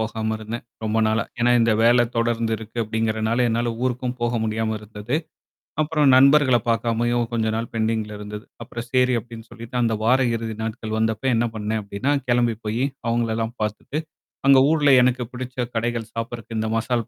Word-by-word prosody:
போகாம 110 0 -2
இருந்தேன். 110 +2 -6 0.2
ரொம்ப 110 +1 0
நாளா. 110 +1 +1 0.2
ஏன்னா 120 +1 +3
இந்த 115 -1 +3
வேல 120 +1 +5
தொடர்ந்து 115 -1 0
இருக்கு 110 +1 -9
அப்படிங்கிறதுனால, 110 +2 0
என்னால 115 +1 0
ஊருக்கும் 125 0 -1
போக 120 0 0
முடியாம 110 0 -1
இருந்தது. 105 +5 -4 0.7
அப்புறம் 150 -2 +2
நண்பர்களைப் 130 -3 +5
பாக்காமயும் 120 +1 +1
கொஞ்ச 115 -2 0
நாள் 115 0 -3
பெண்டிங்ல 110 -1 -1
இருந்தது. 105 +2 -7 0.2
அப்புறம் 115 +1 -7
செரி 125 -1 +3
அப்படின்னு 115 0 -11
சொல்லித்தான், 115 +2 -3
அந்த 115 - +1
வார 125 +4 +4 0.2
இறுதி 115 -1 -4
நாட்கள் 110 -1 -4
வந்தப்ப 110 +2 -1
என்ன 120 +1 +2
பண்ணேன் 110 0 -2
அப்படின்னா, 100 +8 -1
கெளம்பி 120 -1 +2
போயி, 110 +4 -1 0.2
அவுங்களல்லாம் 115 0 -1
பாத்துட்டு, 110 +7 -3 0.5
அங்க 135 -1 +8
ஊர்ல 150 -3 +3
எனக்குப் 125 -1 +1
பிடிச்ச 125 0 -7 0.2
கடைகள் 115 -1 -2
சாப்பிடறக்கு, 115 -1 -5
இந்த 110 - -1
மசால் 115 0 -1
115 Hz, 160 wpm, -23 LUFS, 110-120 Hz, 0.7 s, அங்க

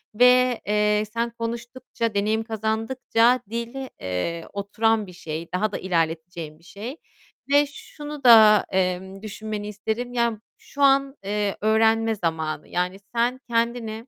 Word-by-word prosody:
ve, 250 +1 +5
eee, 210 0 +2
sen 235 +1 0
konuştukça, 235 0 -4
deneyim 215 +2 +1
kazandıkça 225 +2 +1
dil, 235 +4 -4
eee, 95 - -3
oturan 215 +2 0
bir 180 - -11
şey, 165 -1 -6
daha 210 +3 0
da - - -3
ilerleteceğin 165 -2 -2
bir - - -25
şey 220 - -8 0.5
ve 290 +1 +6
şunu 295 0 -9
da, 220 -3 +8
eee, 185 -1 +1 0.2
düşünmeni 215 0 -5
isterim. 220 +4 -4
Yani, 235 -2 +1 0.2
şu 285 - -9
an, 275 0 +4
eee, 205 0 -1
öğrenme 225 +1 +3
zamanı, 160 -5 -3
yani, 180 +2 -2 0.2
sen 240 +2 +1
kendini 230 0 -1
220 Hz, 130 wpm, -24 LUFS, 195-235 Hz, 0.5 s, da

